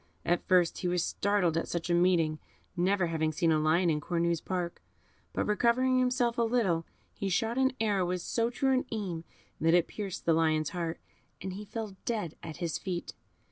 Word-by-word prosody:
At 175 +1 0
first 180 -2 +3
he 180 - -1
was 175 -1 +1
startled 200 -5 +1
at 165 - -1
such 170 0 -3
a - - +4
meeting, 170 -3 +3 0.4
never 185 +1 +2
having 160 -2 0
seen 165 +1 +1
a 155 - +3
lion 160 +4 +3
in 150 -1 -1
Cornue's 170 0 0
park; 180 -2 -3 0.5
but - - -1
recovering 245 +4 +3
himself 250 -2 +1
a - - +4
little, 220 -9 +1 0.3
he 200 - -3
shot 225 +6 0
an 265 0 +3
arrow 205 -5 +1
with 180 0 -1
so 230 0 0
true 265 +2 +1
an 255 - +1
aim 185 -7 -3 0.3
that 165 +2 +4
it 175 -1 +3
pierced 200 -4 -6
the 165 - +4
lion's 155 -2 +2
heart, 170 -2 -3 0.4
and 190 0 -5
he 205 +3 -7
fell 210 -2 -6
dead 210 -9 -2
at 160 -2 -7
his 170 -3 -2
feet. 180 -3 -4
180 Hz, 195 wpm, -30 LUFS, 165-220 Hz, 0.5 s, a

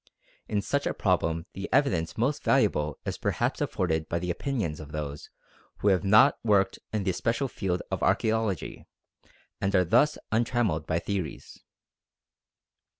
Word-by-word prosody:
In 105 -2 -1
such 140 +6 0
a - - -2
problem 85 -3 0
the 95 - -6
evidence 90 - +1
most 135 +6 0
valuable 75 - +2
is - - -4
perhaps - - -1
afforded 80 -3 -1
by 85 - 0
the 90 +1 -2
opinions 95 - -2
of 75 -1 -9
those 75 -1 -5 0.5
who 105 - +2
have 95 -1 +2
not 110 +8 +5
worked 100 -3 +2
in 110 -2 -1
the 95 - +1
special 115 +8 -1
field 95 -7 -2
of - - -1
archæology, 110 -5 0 0.7
and 100 0 +1
are 90 -1 +4
thus 150 - +3
untrammelled 110 -8 0
by 80 - +1
theories. 95 -4 -4
95 Hz, 150 wpm, -27 LUFS, 80-110 Hz, 0.7 s, not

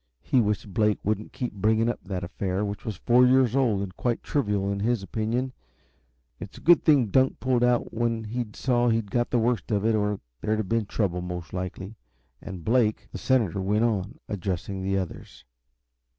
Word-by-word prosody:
He 130 - +3
wished 105 -2 -2
Blake 105 0 +2
wouldn't 105 +1 -2
keep 125 -4 -4
bringing 110 +3 +2
up 120 - -1
that 95 -2 -4
affair, 95 +2 -2
which 100 0 -6
was 110 - -3
four 120 +5 +4
years 130 -1 +4
old 115 -8 +2
and 95 -2 -7
quite 120 -2 -1
trivial, 105 -8 0
in 100 - -2
his 115 0 0
opinion. 115 +6 -2 0.9
It - - -7
was - - -16
a - - -12
good 170 -1 +5
thing 140 -8 +4
Dunk 130 +5 +2
pulled 125 -2 +1
out 125 -1 +1
when 115 -1 -1
he 120 +3 -2
saw 120 -1 +1
he'd 110 -3 0
got 120 -1 +1
the 125 - +1
worst 120 0 0
of 105 -2 0
it, 115 - +3
or 105 -1 0 0.2
there'd 110 0 0
have 110 -3 -2
been 115 0 0
trouble, 90 -5 -1
most 90 -2 -6
likely. 95 +2 -5 0.5
And 95 -4 -8
Blake 115 -2 +1
The - - -6
senator 110 -8 +1
went 105 +4 +1
on, 110 0 -1
addressing 95 0 -3
the 95 +1 0
others. 95 -3 -6
110 Hz, 195 wpm, -26 LUFS, 100-120 Hz, 0.9 s, good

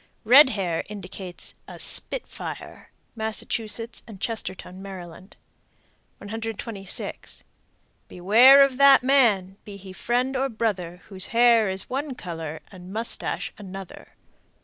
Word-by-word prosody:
Red 260 +5 +8
hair 175 -4 -1
indicates 190 -3 -8
a - - -10
"spit - - -1
fire." - - -9 0.3
Massachusetts 220 +1 -3
and 210 -4 -11
Chestertown, 190 -4 -5
Md. 185 -1 -10 0.8
126. 220 -2 -6 0.6
Beware 240 +10 +7
of 270 -2 0
that 280 -2 +7
man, 215 -9 +3
Be 205 -1 -10
he 190 -1 -11
friend 250 +6 -1
or 270 +1 0
brother, 195 -7 -3
Whose 190 -2 0
hair 230 -3 +4
is 190 0 -3
one 275 +1 -4
color 165 -6 -7
And 185 -1 -12
moustache 225 +3 -1
another. 195 -2 -10
210 Hz, 115 wpm, -24 LUFS, 185-240 Hz, 0.8 s, Red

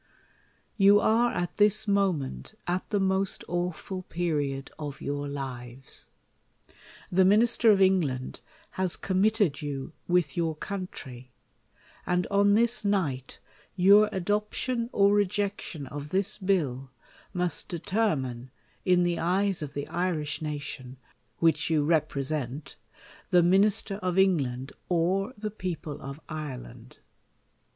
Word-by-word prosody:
You 200 0 +7
are 230 +3 +3
at 175 0 -3
this 210 +1 +3
moment 195 -4 0
at 180 +1 -2
the 205 - +1
most 190 0 0
awful 180 +2 -3
period 150 -6 -2
of 145 -2 -6
your 145 0 -3
lives. 130 -2 -5 1.0
The 190 +1 +4
Minister 225 +4 +4
of 205 -2 +6
England 165 -10 +1 0.3
has 185 -2 -1
committed 195 -4 +1
you 145 0 -5
with 175 -6 +1
your 165 -2 0
country; 150 -9 -7 0.7
and 180 0 0
on 200 0 +4
this 235 0 +2
night 165 -11 -1 0.4
your 200 +3 +6
adop 205 +3 -1
tion 240 -2 -2
or 200 0 +4
rejection 200 -5 -1
of 145 +2 -7
this 195 +4 -1
bill, 150 -10 0 0.4
must 180 -2 -2
determine, 155 - -1 0.3
in 180 -1 +4
the 175 -1 0
eyes 190 +2 +1
of 145 -2 -6
the 145 0 -3
Irish 160 -5 -2
nation, 140 -4 -5 0.5
wliich 160 -2 +3
you 155 -3 +2
represent, 145 -3 -1 0.5
the 180 -2 +5
Min 190 +4 +5
ister 205 -1 0
of 185 -2 -2
England, 140 -9 +1 0.2
or 185 +7 +1
the 210 0 -4
people 175 -7 -5
of 140 +2 -7
Ireland! 125 -6 -8
175 Hz, 125 wpm, -28 LUFS, 145-200 Hz, 1.0 s, You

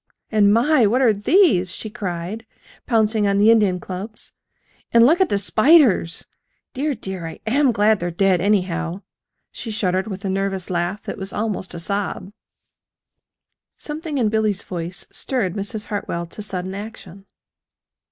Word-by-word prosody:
And, 205 -2 +4
my! 240 +2 +4
what 250 +6 +2
are 230 -4 +5
these?" 205 - +3
she 220 - -6
cried, 190 +3 -5 0.4
pouncing 220 -2 +2
on 200 0 +2
the 210 +3 +6
Indian 205 -5 +3
clubs. 195 +5 -8 0.6
"And 235 0 +6
look 330 +8 +4
at 375 - +3
the 205 - +1
spiders! 215 - +3 0.5
Dear, 285 +1 -1
dear, 190 -6 -6
I 165 - -9
AM 265 +4 +3
glad 210 -1 +3
they're 175 - -2
dead, 180 0 +2
anyhow," 180 -2 0 0.5
she 230 - -7
shuddered 190 -2 -1
with 195 -1 -6
a - - 0
nervous 195 -1 -2
laugh 175 +4 -2
that - - -6
was 195 0 -5
almost 210 -4 -3
a - - -5
sob. 200 +1 -3 1.4
Something 305 0 -5
in 230 -5 +2
Billy's 215 -2 0
voice 175 0 -6
stirred 225 -10 -2
Mrs. 205 +2 -4
Hartwell 170 -4 -4
to 170 - -9
sudden 190 -2 -4
action. 200 -2 -9
205 Hz, 150 wpm, -21 LUFS, 185-225 Hz, 1.4 s, the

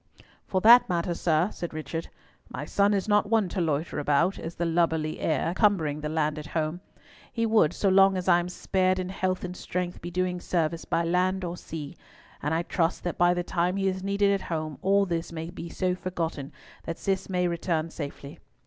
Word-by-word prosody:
"For 190 -2 0
that 235 +2 +8
matter, 175 0 0
sir," 170 +2 +1
said 175 -2 -6
Richard, 155 +2 -4 0.4
"my - - -5
son 200 0 +2
is 200 0 0
not 205 0 +3
one 220 -3 +3
to 185 - -2
loiter 155 -1 -1
about, 150 +6 +2
as 165 +1 -6
the 170 - -1
lubberly 160 -2 0
heir, 160 +2 0
cumbering 170 -8 +2
the 150 - -3
land 155 -1 0
at 150 - -8
home. 160 +2 -2 0.5
He 230 -1 0
would, 215 -8 +4
so 200 - -1
long 195 0 +5
as 185 - -4
I 175 -1 +6
am 175 +1 -3
spared 185 0 +1
in 185 -1 -3
health 185 -1 -2
and 180 0 -5
strength, 180 -1 -4
be 175 - -5
doing 180 0 -1
service 165 -2 -1
by 170 - 0
land 185 +2 +1
or 175 0 -3
sea, 155 -4 -7 0.5
and 150 - -1
I 165 +1 +1
trust 170 0 -1
that 175 - -3
by 175 0 +4
the 175 - -1
time 175 +1 0
he 195 0 +1
is 190 0 -1
needed 200 +1 +2
at 195 - -1
home, 155 -4 -4
all 200 +1 +3
this 170 -3 -3
may 165 0 -5
be 170 -1 -7
so 180 +2 -1
forgotten 165 -6 -4 0.3
that 165 - -4
Cis 195 -1 -2
may 180 -1 +1
return 165 -1 -1
safely. 140 -2 -7
175 Hz, 210 wpm, -27 LUFS, 160-185 Hz, 0.5 s, that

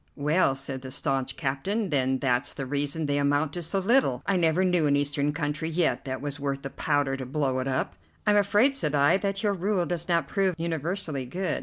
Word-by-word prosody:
"Well," 150 0 +2
said 135 -1 -5
the 130 - -7
staunch 135 -1 -2
captain, 185 +10 -1
"then 130 -3 +1
that's 125 0 0
the 135 - -4
reason 145 +3 -1
they 145 0 0
amount 145 +1 +1
to 175 - -4
so 170 +4 -1
little. 195 - +2
I 200 - +1
never 175 +1 +3
knew 175 -4 +2
an 145 - +3
Eastern 145 0 +1
country 150 +2 -2
yet 165 0 0
that 130 -1 -4
was 145 0 -4
worth 140 -1 -3
the 135 - -5
powder 145 -3 0
to 130 -1 -5
blow 135 -1 0
it 130 - -2
up." 130 -9 -1 0.3
"I'm 210 - +4
afraid," 205 +6 +4
said 150 - -1
I, 145 +5 +4
"that 195 +1 -2
your 205 -1 +2
rule 190 -1 0
does 170 0 -3
not 170 -4 +2
prove 190 -1 +1
universally 165 -3 -3
good. 185 +8 -2
150 Hz, 215 wpm, -27 LUFS, 135-180 Hz, 0.3 s, I'm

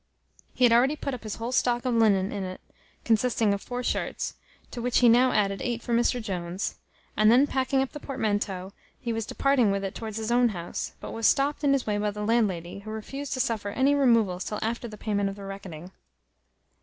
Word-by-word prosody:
He 255 - 0
had 240 -2 +6
already 260 +5 +4
put 280 -2 -4
up 255 - -6
his 215 -2 -5
whole 230 +2 -4
stock 245 -1 +1
of 250 - +1
linen 205 -4 +3
in 200 -2 -3
it, 185 0 -6 0.5
consisting 225 -2 +2
of 200 - -3
four 245 0 -5
shirts, - - -2 0.4
to 240 - -5
which 245 +1 +1
he 245 - +6
now 245 +2 +5
added 200 -2 +1
eight 240 -2 -2
for 240 - -2
Mr 240 +1 +2
Jones; 185 -3 -4 0.4
and 215 +1 +5
then 255 +4 +6
packing 265 -1 +1
up 270 - -6
the 295 - -8
portmanteau, 205 -8 -2 0.3
he 235 -2 -3
was 225 -1 -3
departing 275 -6 +2
with 195 0 -1
it 195 - -3
towards 220 -2 -6
his 220 +1 -3
own 245 0 +4
house, 175 -4 -5
but - - -7
was 225 -1 +1
stopt 285 +2 +2
in 285 - +4
his 275 - 0
way 210 -1 0
by 210 0 0
the 210 0 -4
landlady, 200 -6 0
who 210 +2 -10
refused 270 +6 -5
to 260 - -3
suffer 225 -5 -1
any 265 +7 +2
removals 230 -10 +3
till 210 - -4
after 235 +2 -2
the 215 -2 -10
payment 205 -2 -1
of 195 - -6
the 200 - -10
reckoning. 190 -3 -8
225 Hz, 220 wpm, -27 LUFS, 200-250 Hz, 0.5 s, had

